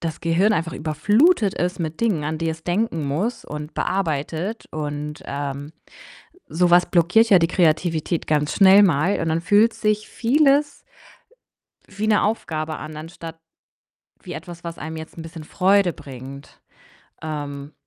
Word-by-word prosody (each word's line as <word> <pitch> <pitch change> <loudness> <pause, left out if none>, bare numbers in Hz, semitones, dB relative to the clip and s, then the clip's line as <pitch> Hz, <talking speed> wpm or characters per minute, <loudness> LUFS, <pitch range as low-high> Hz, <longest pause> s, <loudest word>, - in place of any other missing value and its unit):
das 165 -2 -4
Gehirn 175 +6 +2
einfach 165 -3 -2
überflutet 205 - +2
ist 180 0 -2
mit 160 -1 -4
Dingen, 200 -11 0
an 155 +1 -2
die 165 0 -1
es 160 0 -7
denken 175 -4 -1
muss 190 - -2
und 150 +1 -7
bearbeitet 170 +3 -2
und, 150 0 -5
ähm, 140 +1 -5 0.8
so 175 +2 +1
was 175 +1 +5
blockiert 180 +7 +3
ja 190 - +9
die 165 - +2
Kreativität 165 -1 0
ganz 150 -1 +1
schnell 195 +1 +7
mal. 175 +2 +2
Und 165 - -2
dann 165 +1 0
fühlt 210 +5 +4
sich 215 0 -1
vieles 285 +3 +2 1.1
wie 210 +2 -4
'ne 215 -1 +3
Aufgabe 160 -7 -2
an, 155 0 -8
anstatt 165 +1 -9 0.8
wie - - -8
etwas, 175 -2 -9
was 170 0 -6
einem 160 +1 -6
jetzt 160 +1 -10
'n - - -6
bisschen 165 -1 -9
Freude 190 +1 +2
bringt. 135 +1 -11 0.6
Ähm 145 -2 -6
165 Hz, 150 wpm, -22 LUFS, 155-200 Hz, 1.1 s, ja